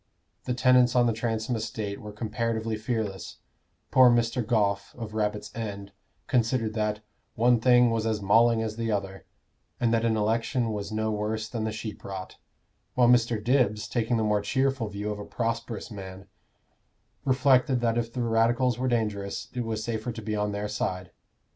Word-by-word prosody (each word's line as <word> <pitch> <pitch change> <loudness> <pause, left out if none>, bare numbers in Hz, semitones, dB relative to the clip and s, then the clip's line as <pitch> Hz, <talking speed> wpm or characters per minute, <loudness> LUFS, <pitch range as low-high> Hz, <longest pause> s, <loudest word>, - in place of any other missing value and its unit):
The 125 - -1
tenants 125 -1 +4
on 120 -1 +5
the 115 - +2
Transome 115 +1 -2
estate 110 -2 -4
were 105 - -8
comparatively 110 +1 -2
fearless: 110 -4 -4 0.5
poor 130 -1 +7
Mr. 120 +1 +2
Goffe, 100 -3 0
of 115 -3 -7
Rabbit's 105 -1 -2
End, 100 -3 -5 0.3
considered 115 -1 +1
that 105 -1 -1 0.3
"one 120 +1 +4
thing 125 0 +5
was 115 -1 0
as 110 -2 0
mauling 115 +3 +4
as 110 0 -4
the 115 -1 -1
other," 95 -2 -4 0.5
and 115 -1 +2
that 115 0 +2
an 115 -1 +2
election 115 +2 0
was 105 +1 -4
no 110 0 -1
worse 110 +1 -2
than 115 -1 -3
the 110 - -1
sheep 110 -1 -7
rot; 95 -1 -7 0.6
while 125 -1 +5
Mr. 120 -1 +4
Dibbs, 115 -4 +2
taking 115 +1 0
the 110 - +1
more 105 -1 +2
cheerful 130 +2 0
view 105 +1 -4
of 105 - -5
a - - -5
prosperous 115 0 -3
man, 95 -2 -8 1.0
reflected 130 -1 +3
that 115 0 +1
if 115 0 -3
the 125 0 -2
Radicals 120 +2 +2
were 130 - 0
dangerous, 105 -5 -2
it 125 - -2
was 110 -1 -3
safer 115 +1 -3
to 115 - -7
be 110 0 -2
on 105 0 -1
their 105 +1 -3
side. 95 -3 -3
110 Hz, 175 wpm, -27 LUFS, 105-120 Hz, 1.0 s, poor